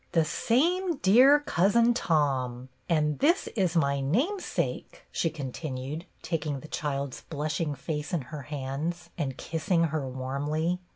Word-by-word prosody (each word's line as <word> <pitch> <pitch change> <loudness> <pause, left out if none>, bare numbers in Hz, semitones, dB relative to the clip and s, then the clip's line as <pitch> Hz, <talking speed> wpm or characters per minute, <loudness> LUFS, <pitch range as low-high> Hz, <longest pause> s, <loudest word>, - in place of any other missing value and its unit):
" - - -38
The 165 -2 +4
same 335 - +1
dear 265 +7 +6
Cousin 230 +1 +3
Tom. 130 - 0 0.2
And 150 -3 +2
this, 335 +6 +3
is 185 -5 0
my 140 -4 +2
name 260 - +1
sake," - - -3
she 165 - 0
continued, 140 +1 -5 0.2
taking 150 -4 -2
the - - -10
child's 140 -3 -3
blushing' 150 0 -2
face 150 +2 -4
in 170 - 0
her 150 - -4
hands 145 +5 -4
and 140 -6 -3
kissing 165 +2 0
her 145 -4 -1
warmly. 145 +7 -1
155 Hz, 140 wpm, -28 LUFS, 140-185 Hz, 0.2 s, dear